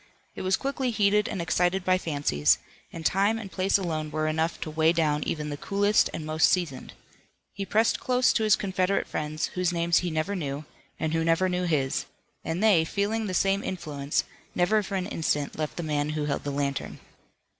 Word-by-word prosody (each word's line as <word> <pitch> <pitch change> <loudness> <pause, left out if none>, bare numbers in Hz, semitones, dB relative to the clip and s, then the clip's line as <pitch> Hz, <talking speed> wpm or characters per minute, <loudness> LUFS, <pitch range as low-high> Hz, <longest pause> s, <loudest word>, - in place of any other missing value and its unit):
It - - -7
was 185 0 +2
quickly 270 -2 -2
heated 210 -2 +2
and 175 - -3
excited 180 +3 +1
by 185 0 +3
fancies, 140 - +2 0.3
and 165 -1 -8
time 200 +5 +2
and 210 -4 -7
place 190 +1 +2
alone 160 -5 -3
were 155 0 -1
enough 160 +2 0
to 155 - -4
weigh 160 +1 +3
down 150 -3 +1
even 150 -1 -3
the 145 - -4
coolest 205 +5 +2
and 155 - -5
most 155 +1 +3
seasoned. 165 -8 -1 0.6
He 195 -1 -5
pressed 220 +2 +2
close 250 0 +2
to 220 - +1
his 215 -1 +5
Confederate 190 -1 0
friends, 155 +1 -3
whose 180 -1 0
names 170 0 +2
he 180 - -2
never 160 +5 -1
knew, 145 -4 -4 0.3
and 160 0 -1
who 165 0 +1
never 165 +3 +2
knew 180 0 -1
his, 140 -6 0 0.4
and 165 +5 -2
they, 200 -7 +5
feeling 210 +5 -1
the 185 - -2
same 195 +2 +2
influence, 150 -6 -2 0.3
never 210 +5 +3
for 200 0 -5
an 185 -1 -1
instant 150 -6 -1
left 155 -1 -4
the 175 - -3
man 150 -1 -1
who 155 -1 -2
held 145 -1 -2
the - - -1
lantern. 140 -1 -3
170 Hz, 200 wpm, -27 LUFS, 155-195 Hz, 0.6 s, his